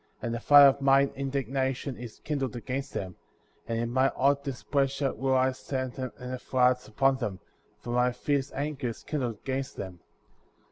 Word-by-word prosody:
And 115 - -3
the 115 - -2
fire 145 +3 +8
of 140 0 +4
mine 135 0 +4
indignation 135 -1 -2
is 120 -2 -9
kindled 135 -6 -2
against 130 +3 -4
them; 90 -2 -5 0.5
and 115 0 -1
in 120 0 -1
my 130 +2 +3
hot 140 +1 +1
displeasure 140 0 -1
will 130 +3 0
I 130 0 +3
send 130 0 -4
in 130 -1 -3 0.2
the 130 - -4
floods 125 -1 +2
upon 135 +5 +2
them, 105 -7 -4 0.4
for 120 - -7
my 125 +1 +3
fierce 140 +2 -1
anger 145 -2 -3
is 115 - -6
kindled 125 -7 -2
against 135 0 -3
them. 95 -2 -7
130 Hz, 175 wpm, -28 LUFS, 125-140 Hz, 0.5 s, fire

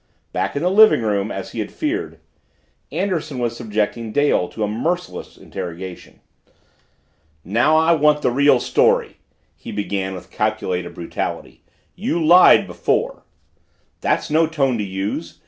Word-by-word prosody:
Back - - -2
in 145 - -2
the 180 - +2
living 215 - +6
room, 105 -1 0
as 95 - -6
he - - -6
had 105 - -4
feared, 335 +7 -3 0.7
Anderson 165 -8 -2
was 120 -1 -2
subjecting 110 0 -2
Dale 145 -9 +2
to 110 - -4
a - - +1
merciless 170 +12 -3
interrogation. 90 +1 -8 1.2
"Now 120 - +3
I 160 +1 +4
want 150 -2 +3
the - - +2
real 140 0 +4
story!" - - +1 0.4
he - - -9
began 100 -2 -3
with 90 - -11
calculated 90 -1 -2
brutality. 85 - -5 0.3
"You 195 -3 -2
lied 180 +3 +7
before!" - - -2 0.7
"That's - - -1
no 160 +1 +3
tone 135 -7 0
to - - -1
use! 95 +1 -4
120 Hz, 140 wpm, -20 LUFS, 100-160 Hz, 1.2 s, lied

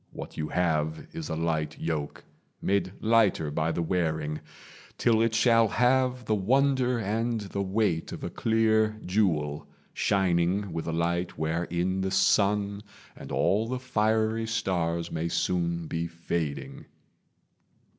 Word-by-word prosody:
What - - -8
you 75 - -3
have 80 -3 0
Is 165 -2 -5
a - - -2
light 80 -2 -2
yoke, 75 -3 -3 0.4
made 100 -1 0
lighter 110 -9 +3
by 80 +2 0
the 85 - -1
wearing, 80 -3 -1 0.6
Till 115 -2 +3
it 115 -1 +1
shall 115 -1 +5
have 125 +2 +2
the 110 - +1
wonder 125 +4 +2
and 115 +2 -1
the 100 0 -4
weight 95 -4 0
Of - - -7
a - - -4
clear 110 -1 +2
jewel, 80 -7 0 0.3
shining 95 0 +1
with 80 0 -4
a - - -1
light 85 +2 -1
Wherein 85 +4 -1
the 95 - 0
sun 100 +1 +2 0.3
and - - -10
all 105 +4 +2
the 130 +2 -2
fiery 110 -2 0
stars 85 -6 -1
May 80 +1 -2
soon 85 -1 -1
be 85 +2 -2
fading. 85 -3 -4
95 Hz, 135 wpm, -28 LUFS, 85-110 Hz, 0.6 s, shall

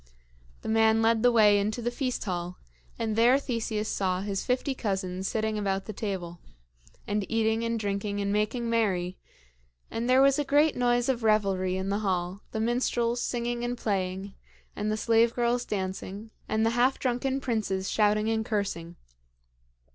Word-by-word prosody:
The - - -6
man 220 0 +3
led 225 0 +3
the 245 +1 +5
way 210 -3 +5
into 210 +4 -1
the 240 0 -1
feast 250 0 -2
hall, 180 -3 -4 0.4
and 220 -1 -2
there 240 +4 +5
Theseus 225 -5 -2
saw 185 -3 -1
his 195 -1 -2
fifty 255 +2 0
cousins 190 -5 -2
sitting 220 -1 -1
about 195 -1 -1
the 215 - -6
table, 185 -5 -4 0.7
and 210 0 -1
eating 225 0 +1
and 230 0 -1
drinking 200 0 -2
and 200 0 -1
making 220 +3 0
merry; 190 -6 0 0.7
and 235 +2 -2
there 260 +1 +6
was 275 +1 +4
a - - +2
great 295 +2 +3
noise 245 -1 +2
of 255 -3 0
revelry 195 -4 +1
in 190 +1 -3
the 200 +1 0
hall, 185 -1 -2
the 220 - -3
minstrels 240 +1 0
singing 240 0 -2
and 245 0 -2
playing, 190 -2 -2 0.4
and 210 +1 -2
the 215 - -1
slave 230 +1 +3
girls 240 0 +1
dancing, 195 +2 -4 0.2
and 220 +1 +1
the 225 - +2
half 245 +3 +2
drunken 260 +1 -1
princes 215 -7 -1
shouting 210 0 +2
and 225 0 +1
cursing. 195 -6 -3
220 Hz, 170 wpm, -28 LUFS, 195-240 Hz, 0.7 s, there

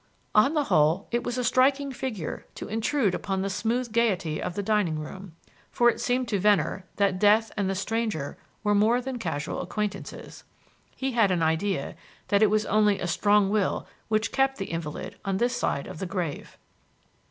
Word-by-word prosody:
On 245 +9 +4
the 300 - +3
whole, 160 - +2
it 240 +1 0
was 245 -1 -3
a 250 - 0
striking 270 +3 +3
figure 240 - -5
to - - -6
intrude 225 0 0
upon 190 -1 -2
the 195 - -2
smooth 235 +4 -1
gaiety 190 -9 +1
of 175 - -4
the 205 - -2
dining 200 -6 +1
room, 170 +3 -8 0.3
for 240 0 +4
it - - -9
seemed 250 0 0
to 205 -3 0
Venner 200 -1 +2
that 195 -2 +1
death 215 +2 +4
and 200 -3 0
the 195 - -1
stranger 205 -7 -2 0.3
were 210 -1 +2
more 220 +4 +4
than 255 0 -5
casual 145 -9 -3
acquaintances. 210 -2 -5 0.5
He 270 0 -2
had 225 -5 +3
an 175 -3 +1
idea 160 0 0 0.3
that 200 0 +3
it 215 - +6
was 215 +1 +1
only 210 -1 +3
a - - -3
strong 205 +3 +3
will 205 -3 0 0.2
which 215 0 0
kept 270 0 +1
the 195 - -5
invalid 165 -3 -5
on 195 -1 -1
this 240 +4 +1
side 140 - -1
of - - -8
the 190 - -3
grave. 175 -5 -4
210 Hz, 185 wpm, -26 LUFS, 190-235 Hz, 0.5 s, it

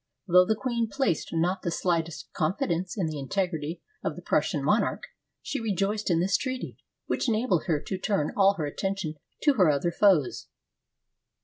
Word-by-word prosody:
Though 180 +1 +6
the 220 - +1
queen 235 -1 -1
placed 265 - 0
not 175 +3 0
the 170 - -2
slightest 165 -1 -2
con 155 +5 0
fidence 175 +2 -1
in 190 - +1
the 155 -2 -3
integrity 165 +1 -2 0.2
of - - -2
the - - -10
Prussian - - +1
monarch, - - +1 0.4
she 285 - -3
re 220 -4 -1
joiced 205 +3 0
in 170 -2 +3
this 190 +3 +2
treaty, 260 -1 -4 0.3
which - - -1
enabled 215 -6 +1
her 160 -5 +1
to 190 +2 -4
turn 190 -7 0
all 195 0 +5
her 160 -5 -2
attention 190 +2 -3 0.3
to 290 - +5
her 185 - +4
other 150 +4 +1
foes. 175 -7 +3
185 Hz, 180 wpm, -27 LUFS, 165-210 Hz, 0.4 s, Though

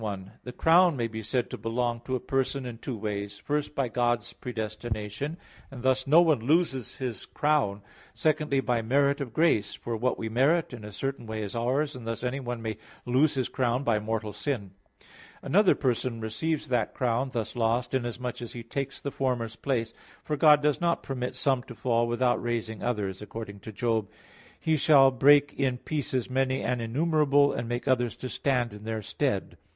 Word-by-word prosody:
1: 100 -3 -5
The 125 - -5
crown 165 +4 +4
may 115 -1 0
be 110 -1 -6
said 120 +3 -1
to - - -5
belong 115 +2 -1
to 130 - -1
a - - -1
person 135 +1 -1
in 120 -2 -7
two 125 -2 -5
ways; 100 -1 -4
first, 150 +5 -2
by 135 -2 +1
God's 120 0 0
predestination, 110 +4 -4 0.3
and 130 -3 -9
thus 130 0 +2
no 160 +5 +7
one 155 -6 +3
loses 135 -1 +1
his 125 -4 -4
crown: 135 -10 +1 0.3
secondly, 150 -3 +1
by 120 -3 0
the 110 - -9
merit 140 +3 +3
of 130 -4 -4
grace; 110 -8 +2
for 120 - -4
what 125 +3 0
we 110 - -3
merit, 135 +8 +2
in 120 -3 -8
a 105 - -8
certain 135 +2 -4
way 110 0 -3
is 100 - -5
ours; 135 +6 0
and 120 -3 -8
thus 115 +1 -3
anyone 125 -2 -3
may 110 -2 -3 0.3
lose 130 +5 +3
his 130 -2 0
crown 125 +1 0
by 115 -5 +2
mortal 110 0 -3
sin. 105 -4 -3 0.7
Another 200 +1 +4
person 125 -3 -1
receives 140 +8 -2
that 120 -4 0
crown 125 +1 0
thus 115 -3 -3
lost, 120 +2 0
inasmuch 125 -1 -2
as 120 - -7
he 120 - -7
takes 135 +3 -4
the 140 - -4
former's 120 -5 -1
place. 115 -3 -1 0.3
For 150 - -1
God 150 0 +6
does 150 +1 +2
not 170 -1 +1
permit 125 -2 -3
some 135 -3 +1
to 120 - -10
fall, 120 -1 +1
without 120 +1 +1
raising 115 -2 -3
others; 105 -6 -2
according 105 -1 -7
to 110 - -9
Job 110 0 0
34:24: - - -26 0.5
"He 160 -1 +2
shall 135 -2 +6
break 145 +3 +5
in 130 -3 0
pieces 130 -3 -2
many 130 0 0
and 125 -1 0
innumerable, 145 +3 +3
and 115 - -3
make 120 0 -3
others 125 -2 +2
to 130 - -6
stand 125 -5 0
in 105 0 -10
their 110 -1 -3
stead." - - -2
125 Hz, 195 wpm, -28 LUFS, 115-140 Hz, 0.7 s, no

